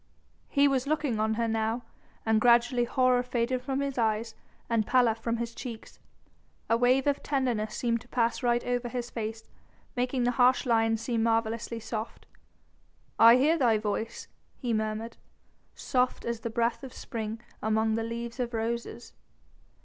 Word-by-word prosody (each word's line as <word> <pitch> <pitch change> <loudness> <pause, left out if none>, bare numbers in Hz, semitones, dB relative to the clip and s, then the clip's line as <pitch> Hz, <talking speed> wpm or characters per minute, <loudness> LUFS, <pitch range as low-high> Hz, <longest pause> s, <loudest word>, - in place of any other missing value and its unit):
He 285 0 +4
was 270 -1 0
looking 295 -7 0
on 220 0 +1
her 230 +1 0
now, 225 +2 -1 0.4
and 220 -1 +3
gradually 240 +1 +4
horror 255 0 +3
faded 250 0 -1
from 270 +2 -2
his 275 -2 -2
eyes 225 0 0 0.3
and 225 -2 +1
pallor 245 -3 +4
from 230 +1 -3
his 235 0 -4
cheeks. 230 -3 -8 0.7
A - - +6
wave 250 +3 +3
of 285 -1 +1
tenderness 245 -7 -1
seemed 235 -2 0
to 245 - -17
pass 235 -1 0
right 240 -1 +1
over 245 0 -1
his 245 -1 -4
face, 225 -1 -4 0.5
making 250 0 0
the 245 - +2
harsh 250 +2 +4
lines 225 -2 +2
seem 230 -1 0
marvellously 230 0 0
soft. 220 0 -6 0.9
"I 230 +1 +9
hear 305 +6 +3
thy 235 -5 +4
voice," 215 +1 -3 0.3
he 245 -3 -2
murmured, 220 +1 -2 0.6
"soft 250 -1 0
as 235 -1 -2
the 230 - -4
breath 235 +2 -1
of 265 - -8
spring 220 -1 -5 0.2
among 220 +1 +1
the 225 - 0
leaves 235 +2 -5
of 240 -1 -2
roses." 235 +1 -4
235 Hz, 160 wpm, -28 LUFS, 225-250 Hz, 0.9 s, I